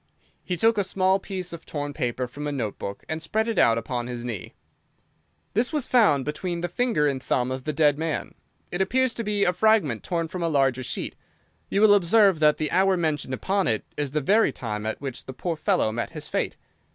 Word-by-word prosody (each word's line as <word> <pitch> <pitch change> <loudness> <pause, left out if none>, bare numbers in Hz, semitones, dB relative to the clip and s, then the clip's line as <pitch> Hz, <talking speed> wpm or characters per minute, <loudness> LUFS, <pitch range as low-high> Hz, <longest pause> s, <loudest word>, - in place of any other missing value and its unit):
He 180 - -3
took 225 +3 +3
a - - +3
small 190 0 +2
piece 185 -3 -5
of 170 - -8
torn 145 -1 -4
paper 125 -1 -2
from 145 +4 -6
a - - -2
note 115 -8 -3
book 100 0 -6
and 160 0 -3
spread 220 +7 0
it 230 - 0
out 115 -1 +5
upon 120 +1 -3
his 120 -1 -5
knee. 115 -7 -6 1.0
"This 230 +5 +1
was 300 -5 0
found 205 - +3
between 170 +3 -3
the 175 - -1
finger 175 -4 +1
and 135 -2 0
thumb 125 0 0
of 130 0 -5
the 155 - 0
dead 150 0 +3
man. 160 -1 -3 0.4
It 175 - -1
appears 255 +5 +2
to 230 - -4
be 205 -1 0
a 180 - +3
fragment 180 - +2
torn 170 -2 -1
from 180 +2 -6
a 170 - +1
larger 135 -4 +2
sheet. 125 - -4 0.5
You 200 - +1
will 215 -1 +7
observe 200 -1 +4
that 150 -1 +4
the 155 -1 -2
hour 190 0 +3
mentioned 150 -5 -1
upon 195 +7 0
it 110 -2 0
is 145 -1 -1
the 150 +3 -1
very 210 +10 +3
time 105 -2 -4
at 110 - -3
which 135 -3 -6
the 130 - -7
poor 170 +5 -3
fellow 110 -7 +1
met 115 +2 -3
his - - -7
fate. - - -2
160 Hz, 225 wpm, -25 LUFS, 130-195 Hz, 1.0 s, will